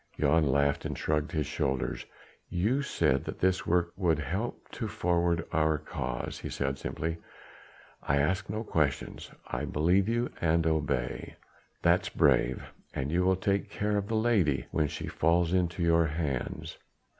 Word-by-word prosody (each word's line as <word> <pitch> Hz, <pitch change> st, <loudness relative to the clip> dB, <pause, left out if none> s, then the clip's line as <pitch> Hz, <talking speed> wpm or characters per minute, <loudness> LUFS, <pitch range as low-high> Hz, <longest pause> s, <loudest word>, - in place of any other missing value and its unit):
Jan 75 Hz, +1 st, +3 dB
laughed 70 Hz, +1 st, +2 dB
and -, -, -4 dB
shrugged 75 Hz, -1 st, 0 dB
his 75 Hz, -2 st, 0 dB
shoulders. 65 Hz, 0 st, -2 dB, 0.4 s
"You 110 Hz, +11 st, +1 dB
said 65 Hz, -, +1 dB
that -, -, -5 dB
this 95 Hz, 0 st, +1 dB
work 85 Hz, 0 st, +2 dB
would 85 Hz, -5 st, +2 dB
help 90 Hz, -, -3 dB
to 115 Hz, -, -4 dB
forward 85 Hz, -4 st, +1 dB
our 80 Hz, -1 st, +2 dB
cause," 65 Hz, -4 st, -4 dB
he -, -, -5 dB
said 70 Hz, -1 st, -2 dB
simply. 80 Hz, +3 st, -3 dB, 0.8 s
"I 70 Hz, -, +1 dB
ask 90 Hz, +7 st, +1 dB
no 105 Hz, +2 st, -2 dB
questions. 75 Hz, -, -1 dB, 0.2 s
I -, -, -3 dB
believe 90 Hz, +7 st, +2 dB
you 120 Hz, +1 st, 0 dB
and 85 Hz, 0 st, +2 dB
obey." 70 Hz, -5 st, -1 dB, 0.5 s
"That's -, -, +3 dB
brave! 65 Hz, +2 st, +3 dB, 0.3 s
And 65 Hz, +3 st, -2 dB
you 90 Hz, +2 st, +2 dB
will 95 Hz, +1 st, +4 dB
take 100 Hz, +1 st, 0 dB
great -, -, -13 dB
care 105 Hz, 0 st, +1 dB
of 100 Hz, -1 st, -1 dB
the 115 Hz, -, -1 dB
lady, 100 Hz, -, +2 dB
when 75 Hz, -2 st, +1 dB
she 75 Hz, -, -5 dB
falls 85 Hz, +1 st, +2 dB
into 85 Hz, -1 st, +1 dB
your 85 Hz, -1 st, +4 dB
hands?" 75 Hz, -5 st, -3 dB
85 Hz, 160 wpm, -29 LUFS, 75-95 Hz, 0.8 s, will